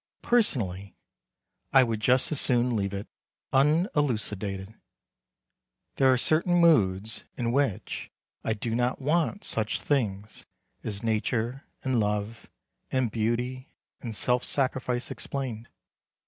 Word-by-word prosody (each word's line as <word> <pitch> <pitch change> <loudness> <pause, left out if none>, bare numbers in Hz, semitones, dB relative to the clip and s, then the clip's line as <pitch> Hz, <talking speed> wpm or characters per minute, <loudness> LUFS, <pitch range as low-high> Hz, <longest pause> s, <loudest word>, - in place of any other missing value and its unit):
Personally, 100 - +1 0.8
I 135 - +7
would 115 -3 -1
just 125 +5 +2
as 150 - +1
soon 125 -1 +2
leave 100 -2 -1
it 100 0 -5 0.5
unelucidated. 120 - +1 1.2
There 135 -1 +5
are 130 - +4
certain 160 +7 +3
moods 110 - +3
in 120 -1 0
which 135 -6 -1 0.3
I 110 - 0
do 115 +1 -3
not 125 +2 0
want 165 +8 0
such 110 -1 0
things 105 -7 -2 0.4
as 105 -1 -4
nature, 115 +3 -1 0.2
and 130 -3 +1
love, 105 +1 -2 0.4
and 130 -4 +1
beauty, 120 +5 -2 0.3
and 115 -3 -5
self 125 +3 +2
sacrifice 130 -2 0
explained. 120 -4 -5
120 Hz, 115 wpm, -27 LUFS, 110-135 Hz, 1.2 s, I